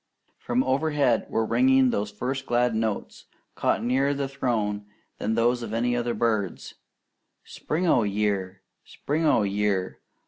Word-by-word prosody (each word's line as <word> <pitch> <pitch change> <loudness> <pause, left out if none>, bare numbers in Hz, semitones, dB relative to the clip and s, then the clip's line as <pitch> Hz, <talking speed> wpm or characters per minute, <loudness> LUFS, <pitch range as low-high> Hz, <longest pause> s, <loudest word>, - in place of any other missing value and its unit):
From 250 +2 0
overhead 140 -3 +1
were 110 - 0
ringing 130 +2 +4
those 105 -1 -1
first 130 +6 -4
glad 120 0 +2
notes, 110 -2 -3 0.3
caught - - 0
nearer 135 +4 +1
the 140 -1 -2
Throne 110 -6 -2 0.3
than 110 +1 -1
those 120 +2 +2
of 115 -1 -4
any 120 +1 +1
other 120 -1 -1
bird, 110 -6 0 0.8
"Spring 165 +4 -3
o' 145 -8 +4
year! 100 -2 -1 0.2
Spring 155 +3 -2
o' 115 - +4
year!" 100 -2 -1
120 Hz, 140 wpm, -25 LUFS, 105-130 Hz, 0.8 s, ringing